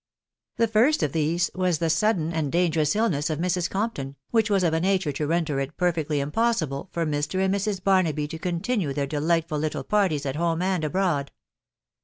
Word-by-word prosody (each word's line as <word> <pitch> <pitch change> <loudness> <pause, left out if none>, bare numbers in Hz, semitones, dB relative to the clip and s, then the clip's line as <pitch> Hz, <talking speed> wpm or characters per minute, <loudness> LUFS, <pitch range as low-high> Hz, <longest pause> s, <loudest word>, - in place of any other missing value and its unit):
^ - - -44
The 230 - +3
first 230 +8 +3
of 145 - 0
these 165 +3 0
was 185 -3 +1
the 165 - 0
sudden 165 0 +1
and 155 -4 -1
dangerous 165 -3 +2
illness 175 -10 +1
of 155 - -1
Mrs. 180 +1 0
Compton, 195 -10 -3 0.2
•which 225 -1 +3
was 195 -2 +2
of 165 -2 +2
a 160 - +2
nature 185 -3 +1
to 145 +1 -3
render 160 -3 0
it 135 +2 -4
perfectly 160 -4 0
impossible 155 - -1
for 170 -1 -1
Mr. 145 +3 -2
and 190 - +1
Mrs. 200 -1 -2
Barnaby 170 -7 +2
to 160 0 -6
continue 175 - -1
their 140 0 -1
de 145 +1 -3
lightful 165 -1 +1
little 155 0 -2
parties 185 -9 +1
at 135 +1 -2
home 165 0 0
and 185 -3 0
abroad. 155 -3 0
170 Hz, 200 wpm, -25 LUFS, 150-190 Hz, 0.2 s, The